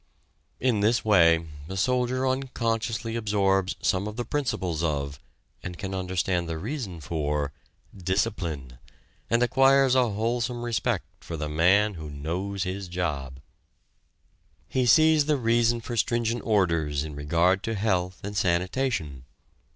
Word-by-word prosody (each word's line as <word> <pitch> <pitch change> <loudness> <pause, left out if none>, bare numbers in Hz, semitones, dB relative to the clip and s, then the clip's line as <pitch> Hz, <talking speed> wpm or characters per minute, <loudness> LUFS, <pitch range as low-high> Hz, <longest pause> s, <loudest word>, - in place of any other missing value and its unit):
In 120 -4 +1
this 110 +4 +2
way 85 -5 +5 0.2
the 95 - -5
soldier 125 +4 +1
unconsciously 115 -3 -1
absorbs 100 -3 +1
some 95 +2 +1
of 105 - -6
the 120 0 -3
principles 95 - -2
of, 70 -4 -2 0.4
and 90 0 -7
can 95 -2 -5
understand 90 -2 -1
the 80 - -3
reason 105 - -5
for, 75 -1 -2 0.4
discipline, 90 - -2 0.5
and 115 +1 +3
acquires 135 +1 +4
a 125 -2 +3
wholesome 120 +3 -1
respect 115 -4 -1
for 85 - -7
the 75 0 -3
man 95 +7 +3
who 80 -4 -7
knows 90 +7 -3
his 95 +1 -4
job. 75 -7 -3 1.3
He 130 -1 0
sees 155 +3 +5
the 150 -1 +3
reason 120 -1 +2
for 120 +1 -5
stringent 115 +1 0
orders 85 -9 +1
in 75 -1 -6
regard 85 +6 +2
to 115 - -2
health 95 -3 -1
and 100 +1 -5
sanitation. 90 - -1
100 Hz, 135 wpm, -26 LUFS, 85-120 Hz, 1.3 s, way